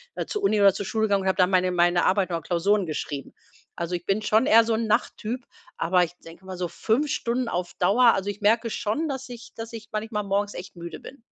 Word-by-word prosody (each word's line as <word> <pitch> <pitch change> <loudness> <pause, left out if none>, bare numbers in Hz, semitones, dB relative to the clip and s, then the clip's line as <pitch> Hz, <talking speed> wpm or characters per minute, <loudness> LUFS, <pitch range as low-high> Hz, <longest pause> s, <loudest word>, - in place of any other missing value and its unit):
da - - -3
zur 420 - -4
Uni 215 - +2
oder 200 -2 +6
zur 200 - -5
Schule 220 -1 -1
gegangen 200 -1 +1
und - - -2
habe 190 - +1
dann 180 0 +4
meine 185 0 +3
meine 175 0 +3
Arbeit 190 -1 +2
oder 165 - -2
Klausuren 185 +4 +1
geschrieben. 145 -2 -5 0.4
Also, 170 +1 -4
ich 175 - -6
bin 200 +2 0
schon 220 +4 +3
eher 230 +1 +7
so 225 0 0
'n 225 0 -1
Nachttyp, 230 +3 -1 0.3
aber 180 +1 +3
ich 165 - -12
denke 165 +3 -13
mal 185 -1 -7
so 180 -1 -2
5 265 - 0
Stunden 235 0 -1
auf 175 0 -3
Dauer. 230 +7 +5
Also, 195 +1 -2
ich 205 - -13
merke 225 +3 +3
schon, 295 +10 -1
dass 265 -1 -5
ich 235 -1 -10
dass 225 0 -7
ich 220 -1 -9
manchmal 215 0 -3
morgens 200 +1 -1
echt 185 +2 -8
müde 170 0 -8
bin. 265 -2 -12
205 Hz, 245 wpm, -25 LUFS, 180-225 Hz, 0.4 s, eher